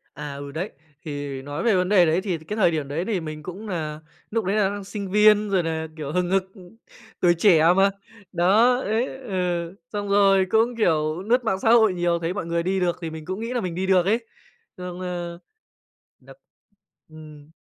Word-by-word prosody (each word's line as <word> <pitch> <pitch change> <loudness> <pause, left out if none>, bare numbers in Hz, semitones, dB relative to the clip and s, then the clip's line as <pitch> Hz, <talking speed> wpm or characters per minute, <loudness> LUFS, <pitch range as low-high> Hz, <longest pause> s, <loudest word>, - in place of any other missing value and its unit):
À, 145 0 -6
ừ, 140 0 -7
đấy. 175 +7 -4 0.4
Thì 145 -2 -5
nói 145 +3 -5
về 230 -4 +3
vấn 180 0 +1
đề 185 -4 +5
đấy 165 +4 +1
thì 185 -5 -2
cái 160 +8 -7
thời 180 -5 +4
điểm 150 -3 -2
đấy 160 +6 -3
thì 210 -5 -1
mình 155 -2 -7
cũng 190 +6 -8
nà 155 -5 -4 0.3
núc 225 -3 -1
đấy 195 +3 0
là 205 -3 +2
đang 205 0 -5
sinh 200 -1 -6
viên, 210 0 +5
rồi 190 -3 +1
nà, 160 -1 -3
kiểu, 150 -2 -5
hừng 180 +1 0
hực, 195 -1 +3 0.8
tuổi 175 -1 +5
trẻ 170 -4 +5
mà. 195 +1 +5 0.4
Đó, 205 +8 +4
đấy 230 +5 -1
ừ, 180 -7 -3 0.2
xong 205 -1 -3
rồi 195 -1 +4
cũng, 230 +2 +2
kiểu, 160 -5 +1
lướt 245 +3 +2
mạng 190 -4 0
xã 225 - +1
hội 220 -5 +5
nhiều, 175 -1 0
thấy 170 +2 -2
mọi 205 -4 -4
người 170 0 -1
đi 190 +2 0
được 175 -1 0
thì 165 - -4
mình 160 -1 -9
cũng 190 +4 -4
nghĩ 230 +2 -4
là 245 - -1
mình 175 -2 -4
đi 190 +2 -2
được 185 -2 +4
ấy. 225 +4 +1 0.5
Xong, 180 0 -7
ơ, 175 -1 -5 0.8
được - - -16 0.7
ừm. 155 -1 -13
180 Hz, 210 wpm, -23 LUFS, 160-205 Hz, 0.8 s, đề